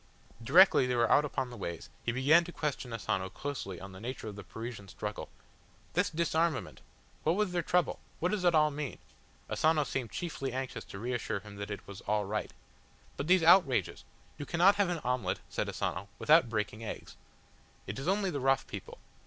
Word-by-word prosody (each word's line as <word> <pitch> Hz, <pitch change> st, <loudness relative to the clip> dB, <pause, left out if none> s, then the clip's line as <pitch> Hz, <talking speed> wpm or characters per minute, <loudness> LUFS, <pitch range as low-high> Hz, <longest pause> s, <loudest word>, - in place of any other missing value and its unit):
Directly 160 Hz, 0 st, +6 dB
they 125 Hz, -, 0 dB
were 120 Hz, -1 st, +2 dB
out 150 Hz, -, +5 dB
upon 130 Hz, -3 st, -3 dB
the -, -, -8 dB
ways 85 Hz, -4 st, -6 dB
he 120 Hz, -, 0 dB
began 140 Hz, +7 st, +5 dB
to 175 Hz, -, -7 dB
question 145 Hz, -6 st, -3 dB
Asano 95 Hz, -4 st, -2 dB
closely 100 Hz, -9 st, -5 dB
on 95 Hz, +2 st, -9 dB
the 95 Hz, -, -11 dB
nature 120 Hz, +1 st, -5 dB
of 105 Hz, -, -6 dB
the 100 Hz, -, -8 dB
Parisian 110 Hz, +2 st, -7 dB
struggle. -, -, -6 dB, 0.6 s
"This -, -, +2 dB
disarmament! 165 Hz, -2 st, 0 dB, 0.4 s
What 160 Hz, +3 st, +2 dB
was 210 Hz, -2 st, +1 dB
their 175 Hz, -1 st, 0 dB
trouble? 175 Hz, +1 st, +1 dB, 0.2 s
What 180 Hz, -, +1 dB
does 210 Hz, -3 st, -1 dB
it 175 Hz, -2 st, +4 dB
all 150 Hz, -1 st, +5 dB
mean?" 145 Hz, -1 st, -4 dB, 0.5 s
Asano 155 Hz, -1 st, +2 dB
seemed 125 Hz, -3 st, -3 dB
chiefly 135 Hz, -2 st, -4 dB
anxious 130 Hz, -5 st, -4 dB
to 95 Hz, -, -9 dB
reassure 120 Hz, -2 st, -2 dB
him 105 Hz, -1 st, -11 dB
that 100 Hz, +1 st, -5 dB
it 100 Hz, -, -6 dB
was 100 Hz, -1 st, -9 dB
"all 105 Hz, 0 st, +1 dB
right." 105 Hz, +2 st, -2 dB, 0.7 s
"But 140 Hz, -, -4 dB
these 180 Hz, -1 st, +5 dB
outrages!" 170 Hz, -6 st, +4 dB, 0.4 s
"You 145 Hz, -, -5 dB
cannot 180 Hz, +4 st, +5 dB
have 200 Hz, -3 st, +2 dB
an 170 Hz, -3 st, -2 dB
omelette," 125 Hz, -7 st, -1 dB
said -, -, -2 dB
Asano, 95 Hz, +4 st, -3 dB
"without 155 Hz, -5 st, +5 dB
breaking 110 Hz, 0 st, -2 dB
eggs. 110 Hz, -, -7 dB, 0.7 s
It 100 Hz, +5 st, -5 dB
is 135 Hz, -, -5 dB
only 195 Hz, 0 st, +1 dB
the 145 Hz, -, -2 dB
rough 135 Hz, 0 st, +2 dB
people. -, -, -8 dB
130 Hz, 195 wpm, -31 LUFS, 105-165 Hz, 0.7 s, Directly